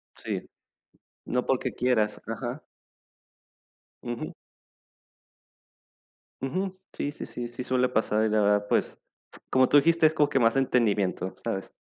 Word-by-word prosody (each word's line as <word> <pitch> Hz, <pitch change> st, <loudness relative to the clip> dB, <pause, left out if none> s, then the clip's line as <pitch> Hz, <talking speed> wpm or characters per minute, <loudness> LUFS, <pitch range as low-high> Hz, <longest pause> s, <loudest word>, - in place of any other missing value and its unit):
Sí, -, -, -4 dB, 0.8 s
no 125 Hz, 0 st, -1 dB
porque 130 Hz, -, 0 dB
quieras, 110 Hz, -4 st, +1 dB
ajá. 120 Hz, +5 st, -4 dB, 1.4 s
Ujú. 120 Hz, -1 st, -5 dB, 2.1 s
Ujú. 185 Hz, +7 st, -3 dB
Sí 145 Hz, -, -2 dB
sí -, -, -7 dB
sí 120 Hz, -1 st, -5 dB
sí 120 Hz, +1 st, -6 dB
suele 130 Hz, 0 st, +2 dB
pasar, 110 Hz, -2 st, +1 dB
y 110 Hz, -, +1 dB
la 105 Hz, 0 st, +2 dB
verdad, 105 Hz, 0 st, +2 dB
pues, -, -, +1 dB, 0.3 s
f -, -, -16 dB
como 130 Hz, 0 st, +4 dB
tú 145 Hz, -, +5 dB
dijiste, 165 Hz, +2 st, +4 dB
es 155 Hz, -, +5 dB
como 150 Hz, -2 st, +3 dB
que 135 Hz, -, +2 dB
más 115 Hz, +1 st, +3 dB
entendimiento, 105 Hz, -8 st, +1 dB
¿sabes? 95 Hz, -, -4 dB
125 Hz, 135 wpm, -27 LUFS, 110-135 Hz, 2.1 s, tú